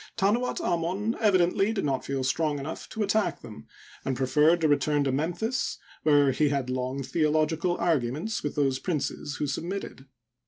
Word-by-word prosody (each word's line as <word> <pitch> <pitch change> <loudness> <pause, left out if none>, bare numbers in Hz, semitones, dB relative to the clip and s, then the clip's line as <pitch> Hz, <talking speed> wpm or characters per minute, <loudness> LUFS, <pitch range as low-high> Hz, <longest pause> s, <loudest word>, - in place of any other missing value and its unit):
Tanuat 225 +6 +1
Amon 180 +6 -1
evidently 195 -1 +3
did 195 - -1
not 135 -2 -1
feel 135 -1 -2
strong 150 +2 0
enough 145 +3 -6
to 220 - -2
at 200 - -3
tack 215 0 +1
them, 105 -10 -11 0.4
and 130 -2 -2
preferred 150 +6 +3
to 160 - +4
return 145 0 +2
to 135 - 0
Memphis, 175 - -1 0.2
where 145 -2 +4
he 150 +3 +2
had 135 -3 -1
long 130 +2 -2
theological 155 +4 +1
arguments 160 - 0
with 145 - -3
those 135 -3 +1
princes 150 -3 -3
who - - -2
subn^itted. 160 -1 -5
155 Hz, 165 wpm, -27 LUFS, 140-180 Hz, 0.4 s, to